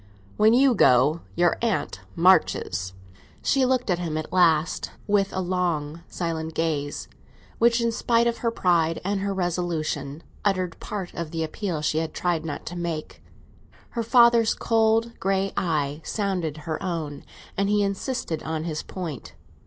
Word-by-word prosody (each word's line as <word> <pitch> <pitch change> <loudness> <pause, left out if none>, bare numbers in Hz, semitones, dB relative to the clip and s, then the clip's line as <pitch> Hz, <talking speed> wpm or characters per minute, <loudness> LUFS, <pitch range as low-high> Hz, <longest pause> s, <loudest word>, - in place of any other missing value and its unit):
"When 220 +2 +5
you 265 0 +5
go, 135 - +4
your 175 0 +2
aunt 230 -3 -1
marches." 160 - +2 0.5
She 270 -2 +3
looked 250 -5 +1
at 175 - +1
him 165 -3 -2
at 155 - -5
last, 165 -3 +3 0.2
with 200 -1 +2
a 190 - -2
long 170 -4 -1
silent 160 -2 -4
gaze, 150 -3 -2 0.5
which, 235 +1 +4
in 235 0 +1
spite 230 +1 +2
of 235 0 0
her 235 - +1
pride 170 -6 +1
and 200 0 0
her 200 +1 -1
resolution, 165 -5 -2 0.2
uttered 185 -4 0
part 195 -4 -5
of 170 -2 -4
the 160 0 -2
appeal 160 -1 -3
she 155 +1 +1
had 160 -1 -4
tried 175 -3 0
not 155 -3 -5
to 175 - -6
make. 170 -3 -4 0.7
Her 235 - -2
father's 235 -1 +5
cold 225 0 +2
grey 195 0 0
eye 150 -3 -1
sounded 185 -7 -2
her 160 -2 -3
own, 160 -6 -4 0.3
and 200 0 0
he 205 0 +3
insisted 200 - -2
on 160 0 -3
his 160 -2 -3
point. 145 - -7
175 Hz, 155 wpm, -25 LUFS, 160-205 Hz, 0.7 s, When